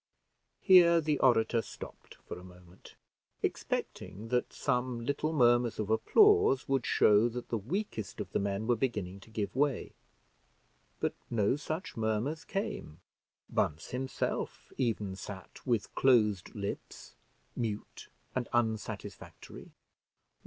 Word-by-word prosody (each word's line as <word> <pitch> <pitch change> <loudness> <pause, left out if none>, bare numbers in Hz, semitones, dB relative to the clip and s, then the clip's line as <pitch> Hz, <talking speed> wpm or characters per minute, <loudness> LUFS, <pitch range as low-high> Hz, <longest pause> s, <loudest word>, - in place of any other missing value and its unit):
Here 175 -3 +7
the 150 -2 0
orator 115 -2 +4
stopped - - -11
for - - -9
a - - -13
moment, 90 0 -15 0.5
expecting 95 +5 -3
that 125 0 0
some 125 -3 -1
little 145 +4 0
murmurs 120 -5 +3
of 110 0 -2
applause 420 - +5
would 135 -3 0
show 105 +3 +5
that 120 +1 -6
the 115 - 0
weakest 125 - -4
of - - -5
the - - +1
men 100 +2 -1
were 120 +1 +3
beginning 105 -6 -2
to 100 - -16
give 110 -1 -3
way; 140 -1 0 1.1
but - - 0 0.2
no 110 +1 +2
such 155 +4 -5
murmurs 115 +9 -1
came. 195 - -4 0.5
Bunce, 75 +1 -1
himself, 130 0 -3
even 105 -6 -1
sat 95 -1 -9
with 115 -4 0
closed 105 -8 +3
lips, 100 -1 -6 0.4
mute 110 -3 -4 0.2
and 130 -2 -2
unsatisfactory. 110 -2 -3
120 Hz, 125 wpm, -31 LUFS, 105-135 Hz, 1.1 s, Here